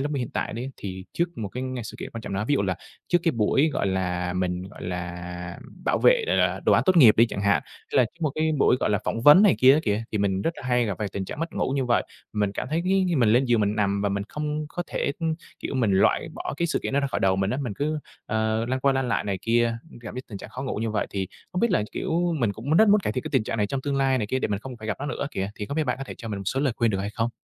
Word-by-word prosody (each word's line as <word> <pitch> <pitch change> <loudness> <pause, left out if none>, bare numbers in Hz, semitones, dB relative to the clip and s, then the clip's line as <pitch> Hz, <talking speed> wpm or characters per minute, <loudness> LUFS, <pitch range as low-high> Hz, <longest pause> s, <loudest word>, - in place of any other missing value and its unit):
lúc 145 +2 -1
mà 140 - -1
hiện 125 - -3
tại - - -2
đấy 120 +5 -4
thì 95 -2 -6
trước 170 -3 -2
một 105 -3 -3
cái 125 +6 -5 0.2
sự - - -8
kiện - - -6
quan 115 - -7
trọng 100 - -6
nào 95 - -1
đó, - - -2
ví 145 - +4
dụ 135 - +1
là 95 -2 0 0.3
trước 175 - +4
cái 165 - +2
buổi, 120 +7 +2
gọi - - 0
là, 90 -2 -1
mình, 90 0 -1
gọi 105 - -12
là, 90 0 -5 0.3
bảo - - +2
vệ, - - +5
ờ, - - +2
ờ, - - +2
đồ - - +3
án - - +5
tốt 185 -1 +4
nghiệp 125 -10 +8
đi 115 - +6
chẳng 100 - -5
hạn, 100 -3 +3
hay - - -20
là 125 - +6
có 115 - -8
một 155 -3 +1
cái 160 0 +1
buổi, 130 - +4
gọi - - +1
là, 105 - +2
phỏng 115 - -1
vấn 150 +8 +9
này 205 -4 +6
kia 130 +1 +7
á 155 - +2
kìa, 105 -2 0
thì 105 - 0
mình 100 -1 0
rất - - +1
là - - -9
hay 125 -1 +2
gặp 105 -3 -1
phải 105 - -2
tình 100 - -3
trạng 120 - -7
mất 165 0 -3
ngủ - - -1
như 135 - +1
vậy. 120 -1 +2 0.3
Mình 105 -2 0
cảm 105 - -4
thấy 160 +2 +1
cái 190 +1 +3
khi 175 - +1
mình 120 -5 +4
lên 120 +5 +4
giường 120 -3 +2
mình 105 +1 +1
nằm 100 -1 +1
và 100 - +2
mình 100 0 -1
không 150 0 -3
có 175 - -4
thể, 140 - -1 0.5
kiểu, - - -4
mình 115 -6 +2
loại 95 - +3
bỏ - - -4
cái 170 - 0
sự - - 0
kiện - - -3
đó 140 - +3
ra 140 - 0
khỏi 135 - -2
đầu 95 -1 +3
mình 95 +1 0
á, 130 - -1
mình 120 -6 -3
cứ, 150 +6 -1 0.3
ờ, 110 +1 0
lăn 130 +1 -1
qua 140 +1 +3
lăn 135 -1 0
lại 115 - 0
này 100 -2 -2
kia, 115 0 +2 0.2
gặp 115 -3 -7
cái 130 - -5
tình 100 - -7
trạng - - -10
khó 130 - -6
ngủ 135 - -3
như 110 +1 -1
vậy 110 - -1
thì 95 -1 -2 0.3
không 180 - -1
biết 235 - +3
là, 180 - +2
kiểu, 170 +1 0
mình 115 -6 +1
cũng 120 +9 -4
rất 220 +3 +6
muốn 205 +1 +6
cải - - -2
thiện 130 - -2
cái - - -5
tình 130 -6 +2
trạng 115 - -3
này 105 -2 +1
trong 135 +6 -3
tương 140 0 -1
lai 135 -1 +2
này 105 - -1
kia 130 - -1
để - - -1
mình 100 -1 -1
không 130 +1 -8
phải 110 -1 -8
gặp 105 - -1
nó 145 - -3
nữa 145 -1 -3
kìa, 95 +1 -3
thì 105 - -5
không 140 - -4
biết 160 - +2
bạn 125 -2 -1
có 135 - -4
thể - - -8
cho 115 - -7
mình 105 -2 -3
một 100 - -7
số 130 +7 0
lời 140 -3 +1
khuyên 115 -2 +2
được 95 - -1
hay 100 +1 -3
không? 115 +2 -1
115 Hz, 330 wpm, -25 LUFS, 100-140 Hz, 0.5 s, vấn